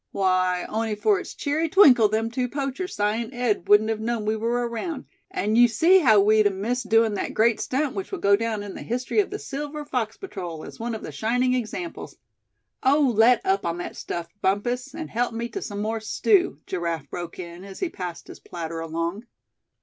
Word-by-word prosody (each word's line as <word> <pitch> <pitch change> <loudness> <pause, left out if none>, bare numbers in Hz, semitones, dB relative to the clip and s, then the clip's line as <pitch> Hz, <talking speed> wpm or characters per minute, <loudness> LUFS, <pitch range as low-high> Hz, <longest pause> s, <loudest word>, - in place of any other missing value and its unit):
"Why, 185 -2 +1
on'y 220 0 -2
for 210 -2 +2
its - - -8
cheery 310 +3 -1
twinkle 265 - +7
them 220 +2 -1
two 250 0 -1
poachers, 280 +7 -4
Si 205 - -2
and 220 +3 0
Ed, 230 -7 0
wouldn't 210 +2 +5
have 220 - -2
known 225 -1 -2
we 215 +1 +1
were 235 +2 0
around; 265 +5 -5 0.2
and 210 +3 -1
you 240 - +8
see 335 - +5
how 230 - +5
we'd 215 +1 +5
have 195 - -2
missed 235 +3 -2
doin' 225 -1 +4
that 205 - -3
great 225 0 +3
stunt 275 +2 -1
which 390 - -5
will 390 - -3
go 200 - +4
down 220 -1 -2
in 200 -2 -7
the - - -8
history 250 - -1
of 410 - +2
the 410 - -4
Silver 295 -2 -6
Fox 230 -6 -2
Patrol 175 - -7
as - - -11
one 230 0 -3
of 220 - -8
the - - -6
shining 250 +3 +1
examples 255 +8 -4 0.3
" - - -53 0.3
"Oh! 275 -1 +4
let 230 +2 +5
up 195 +1 +1
on 170 0 -2
that 175 - -6
stuff, 170 -1 -5
Bumpus, 240 +8 0
and 325 -1 -6
help 235 0 -1
me 235 +1 -2
to 395 - -5
some 205 - -4
more 225 +1 -1
stew," 365 - +2
Giraffe 170 -5 -3
broke 175 -1 -6
in, 175 0 -8
as 195 -1 -10
he 370 - 0
passed 180 - -7
his - - -11
platter 165 -1 -6
along. 165 +6 -3
225 Hz, 215 wpm, -24 LUFS, 200-255 Hz, 0.3 s, you